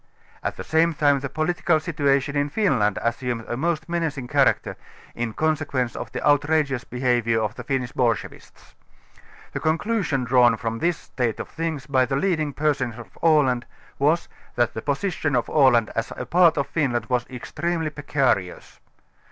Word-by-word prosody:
At - - -3
the - - -5
same 160 +1 +2
time 145 -2 +3
the 135 0 -5
jjolitical 160 +1 +1
situation 140 -3 0
in 145 0 +1
Finland 110 - +1
as 115 0 -1
sumed 120 -3 -3
a - - -2
most 160 +4 -1
menacing 160 -7 -2
character, - - +2 0.4
in 120 -1 -3
consequence 145 -4 -1
of - - -6
the - - -2
out 145 -1 +5
rageous 145 -5 +1
behaviour 120 -2 0
of 105 -1 -1
the - - -8
Finnish 130 -4 -2
bolschevists. 115 -5 -3 0.8
The - - -4
con 155 +1 +1
clusion 180 - -1
drawn 120 -2 +4
from 115 0 -3
this 170 +2 +1
state 120 -4 -3
of - - -6
things 160 -4 -4
by 130 -3 +2
the 135 - -1
leading 155 -1 0
persons 140 -5 -1
of 120 - -12
Aland, 140 -7 +3 0.3
was, 155 +5 +2 0.3
that 120 -1 +1
the 110 - -5
position 145 - -1
of 120 -2 +1
x\.land 125 -7 +4
as 115 - -2
a 125 - -4
part 170 +3 +4
of 140 - +1
Finland 125 -8 -1
was 125 -1 -1
extremely' 160 +5 -3
precarious. 135 -11 -1
140 Hz, 170 wpm, -23 LUFS, 120-155 Hz, 0.8 s, out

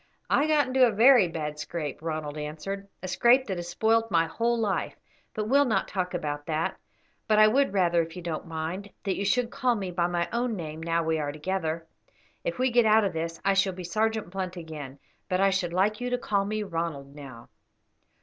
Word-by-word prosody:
"I 290 - +3
got 300 -2 +3
into 255 0 +4
a - - 0
very 230 -1 +6
bad 150 -2 -5
scrape," 150 -1 -5
Ronald 155 -2 -4
answered, 155 +7 -5 0.2
"a - - -3
scrape 240 +7 +4
that 190 -3 -3
has 175 - -5
spoilt 225 +3 +2
my 165 -3 +3
whole 235 +8 0
life; 210 -3 -1 0.4
but 215 - -1
we 215 - -5
will 285 +1 +6
not 210 -6 0
talk 180 -2 -2
about 145 -3 -4
that. 160 0 -1 0.5
But 215 - +3
I 215 0 +8
would 270 +3 +3
rather, 175 -3 +3
if 165 0 -6
you 180 - -7
don't 165 -2 -4
mind, 165 +5 -4
that 195 -2 -1
you - - -2
should 235 +4 +1
call 255 -3 +1
me 195 -4 -4
by 175 -1 +1
my 175 -1 -1
own 240 -1 0
name 160 -3 -6
now 165 0 0
we 160 0 0
are 145 -1 -2
together. 160 +1 -3 0.6
If - - -3
we 255 0 +1
get 240 -1 +4
out 215 +1 +5
of 195 -3 -1
this 165 +1 -4
I 195 - +4
shall 195 -1 +2
be 180 0 -7
Sergeant 215 +1 -1
Blunt 185 -1 -4
again, 150 -5 -8 0.3
but 185 - +1
I 195 0 +4
should 185 -2 -1
like 205 +5 +1
you 250 - -1
to 250 - 0
call 200 -4 0
me 215 +1 -2
Ronald 165 -7 -4
now." 130 -5 -11
185 Hz, 220 wpm, -27 LUFS, 160-220 Hz, 0.6 s, I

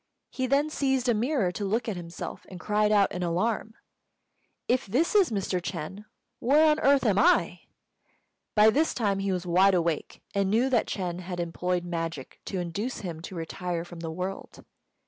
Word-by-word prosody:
He 260 -1 -2
then 285 +3 +2
seized 265 -3 0
a 240 - +4
mirror 230 - +1
to 205 - -5
look 225 +4 -1
at 215 - -2
himself, 170 -1 -7
and 185 - -9
cried 210 +1 +1
out 205 -2 +4
in 180 - -4
alarm: 210 +6 -1 0.9
"If 255 -1 +1
this 265 - +1
is 400 -5 +5
Mr. 195 -4 -1
Ch'êng, 180 +4 -6 0.3
where 290 +6 +4
on 300 - +1
earth 275 -1 +4
am 205 -3 +3
I?" 175 -3 +3 1.0
By 215 +1 +7
this 310 +7 +1
time 200 -5 0
he 195 0 -1
was 180 -1 -2
wide 185 +2 +4
awake, 170 -3 -2
and 200 -1 +1
knew 240 +6 +2
that 240 - +2
Ch'êng 180 -3 -3
had 180 0 -6
employed 175 +1 -2
magic 165 -5 -5
to 195 - -4
induce 195 +8 -3
him 170 -5 -6
to 180 - -8
retire 170 +1 -4
from 175 -1 -10
the 165 -1 -5
world. 185 +4 -6
195 Hz, 185 wpm, -27 LUFS, 175-235 Hz, 1.0 s, By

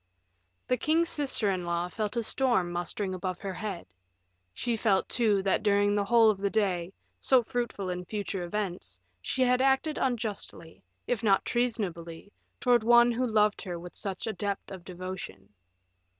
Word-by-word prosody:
The 250 - +2
king's 325 +6 +2
sister 265 -8 0
in 185 -2 -2
law 170 0 -1
felt 210 +4 -3
a 235 - +1
storm 225 -7 +1
mustering 175 +3 -3
above 185 -1 -4
her 195 -2 -4
head; 195 -3 -5 0.7
she 240 - -2
felt, 205 -3 +1
too, 210 -5 +2
that 195 - +1
during 205 -1 +3
the 205 -1 +1
whole 230 0 +6
of 200 - -6
the 200 0 0
day, 185 -4 0 0.3
so 260 -2 +4
fruitful 220 -6 -3
in 180 0 -5
future 200 -1 -4
events, 175 - -4 0.2
she 260 - 0
had 250 0 +3
acted 270 +3 +2
unjustly, 220 -9 -2 0.2
if 245 -3 -1
not 200 -4 +3
treasonably, 200 -7 -2 0.3
towards 240 -2 +3
one 240 +1 +6
who 250 +2 0
loved 210 -2 +2
her 180 -4 -5
with 175 +1 -9
such 195 -2 -4
a 220 - -2
depth 200 +1 -4
of 185 -3 -8
devotion. 180 - -7
205 Hz, 165 wpm, -29 LUFS, 185-235 Hz, 0.7 s, whole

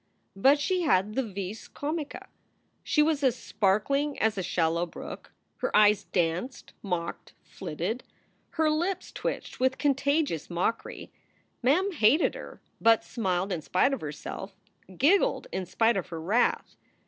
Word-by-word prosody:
But 270 +9 +5
she 365 +5 0
had 210 - +2
the 265 - +1
vis 200 -2 -6
comica. 300 0 -5 0.5
She 300 - +3
was 305 -2 +1
as 255 -3 +3
sparkling 240 +9 0
as 220 0 +1
a 195 - -2
shallow 170 -1 0
brook. - - -9 0.3
Her - - -1
eyes 210 -1 +5
danced, 180 +9 -2
mocked, 175 -4 -4
flitted. 190 +11 -4 0.5
Her 315 -1 +3
lips 355 +4 -1
twitched - - -4
with 260 +1 +2
contagious 280 - +1
mockery. 180 +6 -3 0.5
Mem 330 +11 +3
hated 290 - +3
her, - - -9 0.2
but 225 -1 +5
smiled 190 -4 -1
in 175 -3 -2
spite 185 - +2
of 275 - -3
herself, 155 +6 -7 0.4
giggled 395 - +3
in 185 -2 -3
spite 225 +2 +2
of 190 - -3
her 165 - -6
wrath. 205 +10 +1
225 Hz, 140 wpm, -28 LUFS, 185-285 Hz, 0.5 s, But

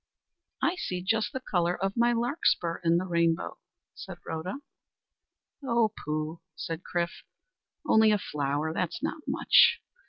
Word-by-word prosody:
"I 355 +2 +2
see 180 - -3
just 220 +3 +1
the 260 - -3
colour 175 -7 0
of 195 +1 -2
my 235 +1 +3
larkspur 235 - +1
in 170 0 +4
the 180 - -1
rainbow," 170 - 0 0.3
said - - -9
Rhoda. 160 +4 -4 1.1
"O 235 -4 +2
pooh!" 155 +2 -3
said 165 -1 -5
Chrif, 175 -2 -3 0.7
"only 220 0 +6
a 210 - +4
flower! 150 -2 -2
That's 175 0 -3
not 310 - -3
much. - - +5
180 Hz, 135 wpm, -28 LUFS, 165-220 Hz, 1.1 s, only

